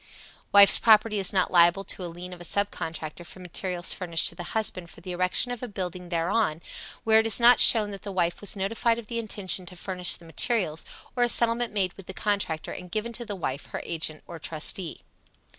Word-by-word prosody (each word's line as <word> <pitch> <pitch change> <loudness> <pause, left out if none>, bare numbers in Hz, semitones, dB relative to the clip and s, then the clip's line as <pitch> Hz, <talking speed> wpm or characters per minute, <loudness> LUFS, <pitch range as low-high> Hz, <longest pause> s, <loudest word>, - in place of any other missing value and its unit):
Wife's 200 -1 +9
property 215 -1 +4
is 190 - +2
not 185 -2 0
liable 175 +2 +4
to 190 - -3
a - - -4
lien 180 +2 -9
of 175 - -12
a - - -8
sub 200 +3 -1
contractor 160 +1 -7
for 175 - -10
materials 180 0 -1
furnished 170 -2 0
to - - -14
the - - -9 0.2
husband 185 -5 -3
for - - -13
the 180 +2 -8
erection 185 +7 0
of 245 - -6
a 250 - -5
building 180 -4 -6
thereon, 170 0 -1 0.4
where 220 0 +5
it 220 - +1
is 225 - +5
not 240 +1 +6
shown 215 -3 +6
that 195 - -9
the 205 - -7
wife 175 -2 -1
was 205 - -2
notified 230 +4 -1
of 235 - -8
the 235 +2 -4
intention 205 -4 -1
to 180 - -9
furnish 180 0 -2
the 170 - -15
materials, 165 -2 -1 0.3
or 245 - -1
a 240 - +3
settlement 235 0 +3
made 190 -4 -1
with 195 - -13
the 190 - -9
contractor 200 -7 -2
and 180 - -9
given 220 +5 -4
to 240 +1 -5
the 205 -2 -6
wife, 140 -7 -5
her - - -6
agent 160 -2 -3
or 170 - -10
trustee. 160 +2 -4
185 Hz, 225 wpm, -25 LUFS, 175-215 Hz, 0.4 s, Wife's